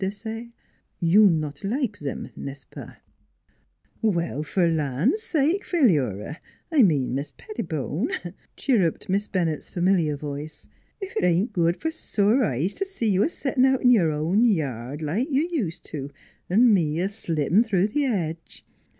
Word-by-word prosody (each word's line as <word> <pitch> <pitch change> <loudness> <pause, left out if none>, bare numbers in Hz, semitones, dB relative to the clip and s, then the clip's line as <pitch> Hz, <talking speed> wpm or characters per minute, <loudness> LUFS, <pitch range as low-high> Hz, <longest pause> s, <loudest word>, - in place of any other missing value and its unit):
Desaye. 220 +4 -5 0.5
"You 195 +5 +6
not 155 -4 -2
like 230 +1 -1
zem 145 -7 -6
n'est 140 0 -6
ce - - -37
pasf - - -10 0.6
" - - -41
"Well, 170 -9 0
f'r 175 +3 +1
th' 165 - +1
land 150 - 0
sake, 335 0 +1
Philura! 150 - +1 0.3
I 310 -4 +5
mean 145 - +3
Mis' 140 +3 -3
Pettibone," 170 - -3 0.5
chirruped 195 - +1
Miss 200 +2 0
Bennett's 165 -6 -2
fa - - -6
miliar 175 -5 +2
voice. 150 +1 -7 0.2
" 410 - -14
Ef 390 - -7
it - - 0
ain't 180 +6 +2
good 170 -1 +1
f'r 320 0 -2
sore 220 -2 +1
eyes 155 - -1
t' - - -2
see 385 - -1
you 190 0 +2
a 305 - +3
settin' 270 -5 0
out 265 -1 +2
in 250 - +6
your 180 -10 +4
own 165 +9 +1
yard, 145 - -1
like 205 - -1
you 290 +3 +1 0.2
ust' 160 - -9
to, 140 -2 -6 0.4
an' 225 +5 +5
me 160 -4 +1
a 185 - +1
slippin' 180 -1 +1
through 195 -5 +1
the 295 +7 0
hedge." 170 -9 -3
185 Hz, 170 wpm, -24 LUFS, 155-235 Hz, 0.6 s, You